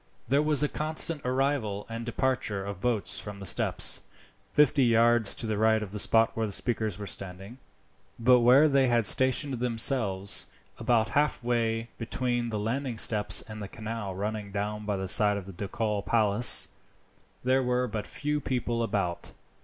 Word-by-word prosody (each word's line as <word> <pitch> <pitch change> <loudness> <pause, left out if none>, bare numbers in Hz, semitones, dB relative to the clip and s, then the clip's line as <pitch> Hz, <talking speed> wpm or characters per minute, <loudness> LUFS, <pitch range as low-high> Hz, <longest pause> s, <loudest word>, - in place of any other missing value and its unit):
There 140 +4 +2
was 150 -1 +3
a - - +2
constant 155 +1 0
arrival 125 -6 -2
and 115 +1 -7
departure 120 -5 -2
of 100 -2 -7
boats 120 -3 0
from 105 -1 -9
the 100 - -8
steps, - - +1 0.5
fifty 145 -1 +3
yards 115 -2 +3
to - - -1
the 110 -2 -3
right 110 0 +2
of 100 - -9
the 105 - -5
spot 115 +2 +3
where 110 -1 -2
the - - -6
speakers 110 -2 -2
were 105 - -7
standing; 95 +5 -9 0.6
but 125 +2 +4
where 125 +6 +5
they 135 -2 +2
had 120 -2 +1
stationed 130 +2 +1
themselves, 115 -5 +1 0.3
about 110 -3 +1
halfway 120 -5 -1
between 120 0 -3
the 110 - -4
landing 120 +3 -3
steps 105 -1 +3
and 110 -1 -10
the 100 - -6
canal 110 -2 -7
running 105 +1 -5
down 105 +1 -5
by 105 -2 -1
the 95 0 -5
side 105 +2 +3
of 100 - -7
the 95 - -11
ducal 105 +3 -3
palace, 110 +1 +6 0.7
there 130 +1 +2
were 125 0 -1
but 105 -2 -6
few 150 +1 -3
people 120 -3 -3
about. 100 -6 -3
115 Hz, 170 wpm, -27 LUFS, 105-125 Hz, 0.7 s, palace